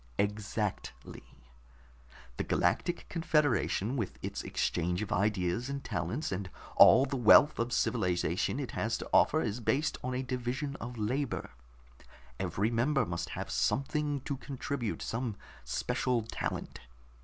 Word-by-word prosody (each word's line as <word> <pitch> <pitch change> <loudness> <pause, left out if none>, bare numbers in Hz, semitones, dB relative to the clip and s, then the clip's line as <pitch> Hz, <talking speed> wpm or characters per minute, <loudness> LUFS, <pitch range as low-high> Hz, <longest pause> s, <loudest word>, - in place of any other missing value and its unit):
"Exactly. 105 0 -3 1.2
The - - -1
Galactic 175 - 0
Confederation, 145 - +1
with 115 -8 -3
its - - -3
exchange 90 +3 -1
of 105 - -7
ideas 100 +3 0
and 140 0 -4
talents, 90 - -3
and 95 0 -3 0.3
all 130 +4 +8
the 140 0 -3
wealth 135 +5 +6
of 115 +1 0
civilization 90 -8 0
it - - -4
has - - -1
to - - -7
offer, - - +5
is 105 - -2
based 140 +7 0
on 125 0 -2
a 130 - -1
division 130 +3 -3
of 120 +1 -7
labor. 125 - -2 0.9
Every 105 +4 0
member 125 +3 +2
must 85 -2 -4
have - - -4
something 140 - 0
to 140 +1 -4
contribute, 130 -4 -4
some 115 -2 -3 0.3
special 115 - 0
talent. 110 - -4
120 Hz, 130 wpm, -31 LUFS, 100-140 Hz, 1.2 s, all